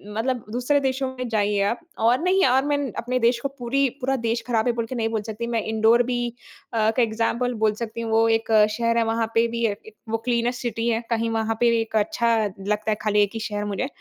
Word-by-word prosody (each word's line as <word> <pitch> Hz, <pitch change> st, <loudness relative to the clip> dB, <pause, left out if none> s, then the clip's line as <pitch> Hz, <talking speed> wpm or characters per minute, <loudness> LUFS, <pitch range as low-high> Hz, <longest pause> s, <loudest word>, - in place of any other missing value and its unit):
मतलब 245 Hz, +2 st, -1 dB
दूसरे 250 Hz, +5 st, +1 dB
देशों 265 Hz, -1 st, -1 dB
में 255 Hz, -1 st, -3 dB
जाइए 205 Hz, -2 st, +1 dB
आप 235 Hz, -, -2 dB, 0.3 s
और 245 Hz, +2 st, +4 dB
नहीं 375 Hz, -1 st, +3 dB
और 265 Hz, +2 st, +3 dB
मैं 290 Hz, 0 st, +1 dB, 0.2 s
अपने 250 Hz, +2 st, -1 dB
देश 235 Hz, 0 st, +2 dB
को -, -, -1 dB
पूरी 270 Hz, +3 st, +1 dB
पूरा 265 Hz, +2 st, +1 dB
देश 230 Hz, +1 st, 0 dB
खराब 230 Hz, -1 st, +1 dB
है -, -, +4 dB
बोल 230 Hz, -1 st, -2 dB
के 255 Hz, -, -6 dB
नहीं 225 Hz, -1 st, 0 dB
बोल 220 Hz, -2 st, -1 dB
सकती, 220 Hz, +2 st, -5 dB
मैं 230 Hz, -1 st, 0 dB
इन्दौर 220 Hz, +2 st, +3 dB
भी 245 Hz, 0 st, -2 dB, 0.5 s
अ, -, -, -1 dB
एक 230 Hz, -, -1 dB
एक्ज़ाम्पल 235 Hz, +2 st, 0 dB
बोल 215 Hz, -1 st, +4 dB
सकती 230 Hz, 0 st, -4 dB
हूँ। 225 Hz, -1 st, -3 dB
वो 225 Hz, +1 st, +4 dB
एक 225 Hz, 0 st, 0 dB, 0.3 s
शहर 230 Hz, 0 st, +1 dB
है, 230 Hz, -, +3 dB
वहाँ 225 Hz, 0 st, 0 dB
पे 230 Hz, +1 st, +4 dB
भी 235 Hz, 0 st, -1 dB
अ, 220 Hz, -, +2 dB
एक 220 Hz, 0 st, -14 dB
वो 225 Hz, -, 0 dB
क्लीनेस्ट 240 Hz, 0 st, 0 dB
सिटी 235 Hz, -1 st, -2 dB
है, 225 Hz, 0 st, 0 dB
कहीं 230 Hz, 0 st, 0 dB
वहाँ 225 Hz, 0 st, -1 dB
पे 240 Hz, -, +4 dB
एक 225 Hz, 0 st, -6 dB
अच्छा 230 Hz, +2 st, +2 dB, 0.2 s
लगता 210 Hz, +2 st, -1 dB
है 210 Hz, -, +2 dB
खाली 210 Hz, -1 st, +2 dB
एक 205 Hz, -, -2 dB
ही 225 Hz, -, -4 dB
शहर 205 Hz, 0 st, -3 dB
मुझे। 205 Hz, +6 st, -2 dB
230 Hz, 245 wpm, -23 LUFS, 220-245 Hz, 0.5 s, और